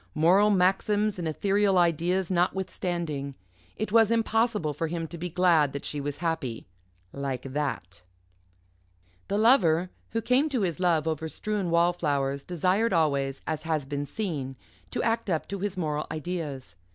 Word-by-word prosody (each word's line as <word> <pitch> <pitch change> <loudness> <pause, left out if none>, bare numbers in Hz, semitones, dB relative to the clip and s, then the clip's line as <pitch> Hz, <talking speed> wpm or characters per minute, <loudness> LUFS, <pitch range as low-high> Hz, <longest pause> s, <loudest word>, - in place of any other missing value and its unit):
Moral 185 +7 +5
maxims 205 +2 +2
and 170 - -2
ethereal 195 +4 +2
ideas 175 +2 +1
notwithstanding, 175 -5 -1 0.4
it 215 -2 -3
was 225 -1 +5
impossible 225 -7 +1
for 165 +3 -2
him 165 0 -3
to 170 - -8
be 175 +2 -4
glad 170 -5 +3
that 140 - -5
she 145 - -3
was 145 0 -4
happy 135 -9 -2 0.5
like 135 -3 -3
that. 130 - -4 1.3
The 200 - 0
Lover 185 -7 +4 0.2
who 225 - -2
came 265 +7 +3
to 260 -6 -1
his 180 -3 -1
love 165 -4 +2
over 160 0 -2
strewn 205 0 -2
wallflowers 150 -5 +1
desired 185 +6 +1
always, 140 -5 +1
as 155 - -2
has 155 -3 -1
been 145 +1 -4
seen, 150 -12 -4 0.3
to - - -2
act 225 -2 0
up 160 -3 -1
to 200 - -4
his 200 0 -3
moral 150 -3 -2
ideas. 155 - -5
170 Hz, 150 wpm, -27 LUFS, 150-195 Hz, 1.3 s, Moral